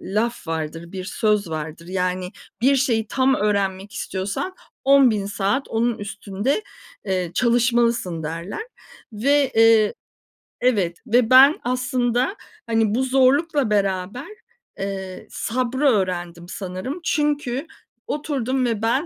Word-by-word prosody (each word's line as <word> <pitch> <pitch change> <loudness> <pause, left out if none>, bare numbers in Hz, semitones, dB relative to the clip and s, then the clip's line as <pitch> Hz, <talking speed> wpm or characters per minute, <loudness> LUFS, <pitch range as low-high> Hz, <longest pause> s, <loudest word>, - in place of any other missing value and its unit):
laf 215 0 -2
vardır, 165 +2 -4
bir 185 -1 -5
söz 210 -3 0
vardır. 160 +1 -6
Yani, 185 0 -2 0.3
"Bir 275 +2 +5
şeyi 230 -5 +1
tam 265 0 +2
öğrenmek 200 -1 -1
istiyorsan 200 - -4 0.3
10.000 255 -8 +5
saat 205 +7 -1
onun 230 +1 0
üstünde, 205 - -2 0.4
eee, 185 -3 -1
çalışmalısın." 235 -7 +2
derler 170 - -5 0.5
ve, 275 +5 +2
eee 225 -2 +5 0.7
Evet, 200 -9 +1
ve 235 0 +3
ben 270 +4 +7
aslında, 250 - 0 0.3
hani, 225 -1 +2
bu 260 - +1
zorlukla 270 +1 +3
beraber, 200 - -1 0.5
eee, 190 -1 -5
sabrı 255 +4 -2
öğrendim 175 -5 -1
sanırım 190 - -5
çünkü 295 -3 0 0.4
oturdum 265 -4 -1
ve 225 -3 -1
ben 260 +8 +1
225 Hz, 115 wpm, -22 LUFS, 190-260 Hz, 0.7 s, ben